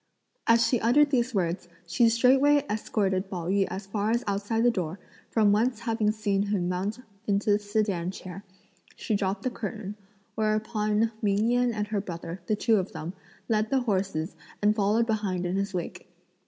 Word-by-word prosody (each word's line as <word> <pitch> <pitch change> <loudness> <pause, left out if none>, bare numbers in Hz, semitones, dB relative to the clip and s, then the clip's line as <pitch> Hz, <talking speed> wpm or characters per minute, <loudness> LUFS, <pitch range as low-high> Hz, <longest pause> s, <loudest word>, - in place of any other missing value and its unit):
As 230 0 +5
she 235 +1 +1
uttered 280 +6 +4
these 250 -2 +1
words, 175 -1 -1 0.2
she 230 +7 +3
straightway 270 +5 +4
escorted 195 -3 -1
Pao 175 -4 -4
yü 195 0 +2
as 190 +2 -5
far 205 +1 -1
as 235 +2 +1
outside 205 +3 0
the 240 - +5
door, 185 -3 -3 0.3
from 215 -3 +3
whence 230 +2 +1
having 225 -2 +1
seen 205 -2 0
him 195 -4 0
mount 195 +6 -2 0.3
into 205 +1 +2
the 205 - +4
sedan 205 -4 -1
chair, 185 0 -8 0.5
she - - -3
dropped 195 0 -1
the 255 - -1
curtain; 210 -2 -5 0.4
whereupon 215 0 0
Ming 210 +2 +2
Yen 245 0 +2
and 210 -2 -3
her 210 -2 0
brother, 170 -1 -7
the 215 - +2
two 220 +1 +3
of 190 -1 -2
them, 165 +4 -5 0.3
led 215 -1 +1
the 270 -1 +2
horses 190 -7 -1 0.2
and 210 +1 +3
followed 215 +2 +2
behind 205 -5 -1
in 175 +1 -1
his 200 0 -1
wake. 180 -1 -5
210 Hz, 180 wpm, -27 LUFS, 195-225 Hz, 0.5 s, As